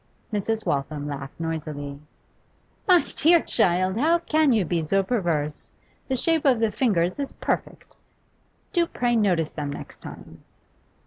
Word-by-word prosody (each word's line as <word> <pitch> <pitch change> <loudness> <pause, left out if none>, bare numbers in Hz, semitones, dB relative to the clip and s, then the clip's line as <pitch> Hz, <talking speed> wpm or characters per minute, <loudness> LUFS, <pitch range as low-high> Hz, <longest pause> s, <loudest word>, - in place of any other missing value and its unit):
Mrs. 220 +2 -1
Waltham 145 +1 -2
laughed 140 -1 -7
noisily. 150 -3 -4 0.9
'My 360 -3 +6
dear 335 +3 +6
child, 185 - +1
how 325 +5 +4
can 315 -3 +2
you 215 -6 +3
be 165 0 -1
so 195 +5 +2
perverse? 170 -9 -1 0.4
The 265 - 0
shape 325 +4 +1
of 260 -5 +4
the 225 -1 +2
fingers 200 -4 +1
is 280 - -3
perfect. - - -4 0.8
Do 345 -3 +3
pray 240 -5 0
notice 180 -8 +1
them 145 -2 -4
next - - -9
time. - - -11
195 Hz, 140 wpm, -25 LUFS, 155-260 Hz, 0.9 s, My